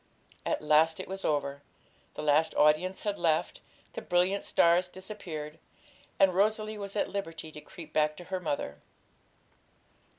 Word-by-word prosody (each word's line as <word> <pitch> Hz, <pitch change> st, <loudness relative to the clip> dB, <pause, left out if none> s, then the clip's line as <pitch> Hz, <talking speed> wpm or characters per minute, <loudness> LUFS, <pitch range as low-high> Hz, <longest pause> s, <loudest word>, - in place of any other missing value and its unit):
At -, -, -1 dB
last 155 Hz, +2 st, +4 dB
it 185 Hz, -, -5 dB
was 190 Hz, +1 st, -5 dB
over; 140 Hz, -1 st, -1 dB, 0.5 s
the 150 Hz, -, -5 dB
last 150 Hz, +2 st, +3 dB
audience 155 Hz, +5 st, +3 dB
had 205 Hz, -1 st, -2 dB
left, 160 Hz, -2 st, +1 dB, 0.3 s
the -, -, -5 dB
brilliant 180 Hz, +3 st, +1 dB
stars 175 Hz, +2 st, +4 dB
disappeared, 175 Hz, -6 st, -7 dB, 0.6 s
and 195 Hz, -2 st, +5 dB
Rosalie 215 Hz, +2 st, +1 dB
was 200 Hz, 0 st, -6 dB
at 205 Hz, -, 0 dB
liberty 165 Hz, -5 st, -5 dB
to 150 Hz, -, -10 dB
creep 160 Hz, -1 st, -12 dB
back 150 Hz, 0 st, +2 dB
to 175 Hz, -, -8 dB
her 185 Hz, +2 st, -3 dB
mother. 140 Hz, -, -3 dB
170 Hz, 145 wpm, -30 LUFS, 150-195 Hz, 0.6 s, and